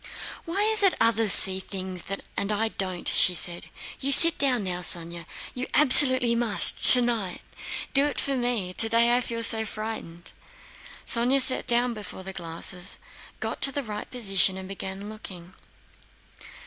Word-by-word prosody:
"Why 375 Hz, +5 st, -4 dB
is 435 Hz, 0 st, +2 dB
it 390 Hz, -2 st, +2 dB
others 225 Hz, -2 st, 0 dB
see 190 Hz, 0 st, +4 dB
things 185 Hz, -2 st, -9 dB, 0.3 s
and 200 Hz, -, -3 dB
I 220 Hz, +2 st, -2 dB
don't?" 185 Hz, -4 st, -5 dB
she 180 Hz, -, +1 dB
said. 175 Hz, +1 st, -4 dB, 0.3 s
"You 275 Hz, -, -3 dB
sit 330 Hz, +4 st, +6 dB
down 255 Hz, -6 st, -1 dB
now, 180 Hz, -2 st, -5 dB
Sónya. 170 Hz, -2 st, -3 dB, 0.3 s
You 255 Hz, +1 st, -7 dB
absolutely 260 Hz, -4 st, +5 dB
must, 235 Hz, -3 st, +2 dB
tonight! 235 Hz, -7 st, +1 dB, 0.5 s
Do 275 Hz, +1 st, +2 dB
it 290 Hz, -, -4 dB
for 275 Hz, -1 st, -2 dB
me.... 240 Hz, -7 st, -4 dB
Today 230 Hz, +3 st, +3 dB
I 250 Hz, -, -1 dB
feel 230 Hz, -1 st, -6 dB
so 225 Hz, -1 st, +1 dB
frightened!" 215 Hz, -6 st, -7 dB, 0.7 s
Sónya 245 Hz, +4 st, +4 dB
sat 260 Hz, -1 st, +5 dB
down 240 Hz, 0 st, +1 dB
before 205 Hz, -3 st, -11 dB
the 190 Hz, 0 st, -10 dB
glasses, 175 Hz, +2 st, -7 dB, 0.4 s
got -, -, -7 dB
the 275 Hz, +1 st, -1 dB
right 210 Hz, -3 st, -9 dB
position, 195 Hz, -6 st, -1 dB
and 190 Hz, 0 st, -10 dB
began 195 Hz, +1 st, -9 dB
looking. 190 Hz, -4 st, -13 dB
220 Hz, 150 wpm, -23 LUFS, 190-250 Hz, 0.7 s, sit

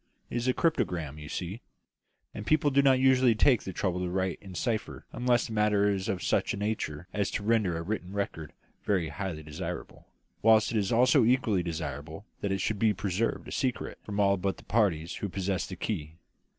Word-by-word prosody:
It -, -, -1 dB
is 120 Hz, +1 st, -1 dB
a 130 Hz, -, +4 dB
cryptogram, 90 Hz, -, 0 dB
you 75 Hz, -1 st, -9 dB
see, 95 Hz, +7 st, -4 dB, 0.7 s
and 105 Hz, -, -6 dB
people 150 Hz, -1 st, +3 dB
do 140 Hz, +1 st, +5 dB
not 135 Hz, -2 st, +5 dB
usually 130 Hz, -3 st, +5 dB
take 120 Hz, +1 st, +4 dB
the 95 Hz, -, -5 dB
trouble 90 Hz, 0 st, -1 dB
to 90 Hz, -1 st, -2 dB
write 95 Hz, 0 st, -1 dB
in 95 Hz, -2 st, -10 dB
cipher 110 Hz, +4 st, -2 dB
unless 120 Hz, -2 st, +2 dB
the 115 Hz, -, -6 dB
matter 105 Hz, -1 st, +3 dB
is 95 Hz, -1 st, -2 dB
of 95 Hz, -, -2 dB
such -, -, +1 dB
a -, -, -7 dB
nature 100 Hz, -6 st, -3 dB
as 100 Hz, -2 st, 0 dB
to 105 Hz, -, -3 dB
render 105 Hz, -6 st, +2 dB
a 85 Hz, -, -4 dB
written 95 Hz, -1 st, -4 dB
record 100 Hz, -6 st, -3 dB, 0.3 s
very 90 Hz, -6 st, +1 dB
highly 85 Hz, -2 st, -5 dB
desirable, 75 Hz, -1 st, -7 dB, 0.3 s
whilst 110 Hz, 0 st, +5 dB
it 115 Hz, -, 0 dB
is 100 Hz, -2 st, 0 dB
also 125 Hz, +3 st, +5 dB
equally 115 Hz, -5 st, +3 dB
desirable 80 Hz, +1 st, -5 dB
that 100 Hz, -, -2 dB
it 95 Hz, -1 st, 0 dB
should 105 Hz, 0 st, -1 dB
be 110 Hz, -1 st, +3 dB
preserved 100 Hz, +4 st, -1 dB
a -, -, -8 dB
secret 130 Hz, -3 st, -2 dB
from 105 Hz, 0 st, -4 dB
all 100 Hz, -1 st, +4 dB
but 95 Hz, +1 st, -2 dB
the -, -, -14 dB
parties 90 Hz, -8 st, +1 dB
who 100 Hz, -, -3 dB
possess 95 Hz, 0 st, -2 dB
the 95 Hz, -, -6 dB
key. 80 Hz, -5 st, -4 dB
100 Hz, 205 wpm, -29 LUFS, 90-115 Hz, 0.7 s, do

